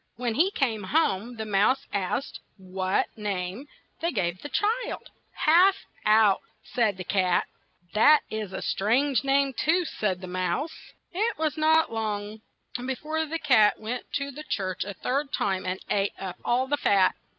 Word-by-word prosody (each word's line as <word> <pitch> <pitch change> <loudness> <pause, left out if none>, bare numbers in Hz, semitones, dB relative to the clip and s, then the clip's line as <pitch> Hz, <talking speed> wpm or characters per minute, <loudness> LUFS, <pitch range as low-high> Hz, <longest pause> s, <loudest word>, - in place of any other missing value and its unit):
When 240 -1 -2
he 330 - +3
came 240 - -1
home, 235 -4 0
the 220 -1 -5
mouse 215 +7 +2
asked 200 +7 -2 0.2
what 185 0 -2
name 205 +4 -4 0.3
they 335 +1 0
gave 180 -6 -2
this 290 - -8
child. 455 +4 -1 0.2
"Half 355 +5 +5 0.3
out," 215 -2 +5 0.3
s 225 -5 +2
'd - - -21
the 185 - -5
cat. 185 -1 +1 0.5
"That 290 +8 +6
is 215 -3 -4
a - - -5
stituige 255 +8 +1
name 275 0 +2
too," 335 +8 +1
said 195 - -2
the - - -6
mouse. 185 - -3 0.2
It 430 +6 0
was 310 -1 -1
not 315 -3 +3
long 215 -1 -3 0.4
be 260 +1 -2
fore 315 +3 -2
the 325 +2 -2
cat 245 -10 +4
went 235 +3 -5
to 280 0 -2
the 295 +3 -9
church 190 -11 -3
a 200 -1 -6
third 275 +2 -2
time, 190 -2 -1
and 185 +1 -2
ate 200 0 0
up 190 -2 -6
all 250 +2 +1
the 290 +2 0
fat. 195 -7 +3
225 Hz, 170 wpm, -26 LUFS, 195-290 Hz, 0.5 s, That